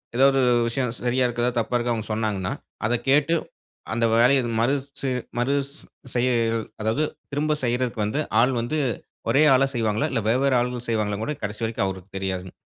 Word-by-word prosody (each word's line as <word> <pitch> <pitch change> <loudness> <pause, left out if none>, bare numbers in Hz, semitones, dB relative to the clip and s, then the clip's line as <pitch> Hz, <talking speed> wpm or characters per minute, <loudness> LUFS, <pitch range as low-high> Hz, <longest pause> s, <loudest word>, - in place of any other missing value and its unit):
எதாவது 135 +1 +5 0.3
விஷயம் 125 0 -1
சரியா 125 +1 +2
இருக்குதா? 120 0 0
தப்பா 120 +2 -1
இருக்கா? 120 0 0
அவங்க 110 -2 -4
சொன்னாங்கனா, 105 -4 -1 0.3
அத 120 - +1 0.2
கேட்டு 145 +4 +4 0.6
அந்த 115 0 +1
வேலைய 125 +4 +5 0.2
மறு 120 +5 +3 0.3
சு 135 - -1 0.3
மறுஸ் 140 +3 0 0.4
செய்ய 125 +1 +2 0.5
அதாவது 110 +8 +1 0.3
திரும்ப 150 +2 0
செய்றதக்கு 120 -2 0
வந்து, 140 +9 -1 0.2
ஆள் 130 +2 +3
வந்து 150 +7 -2 0.5
ஒரே 140 +6 +5
ஆளா 135 +1 +3
செய்வாங்களா? 110 -2 0
இல்ல 115 - 0
வெவ்வேறு 130 +1 +3
ஆள்கள் 125 0 -3
செய்வாங்களான்னு 105 -1 -1
கூட, 150 - -2
கடைசி 105 +2 -4
வரைக்கும் 110 -3 -1
அவருக்கு 95 +1 -7
தெரியாதுங்க. 95 -1 -3
120 Hz, 160 wpm, -24 LUFS, 110-135 Hz, 0.6 s, எதாவது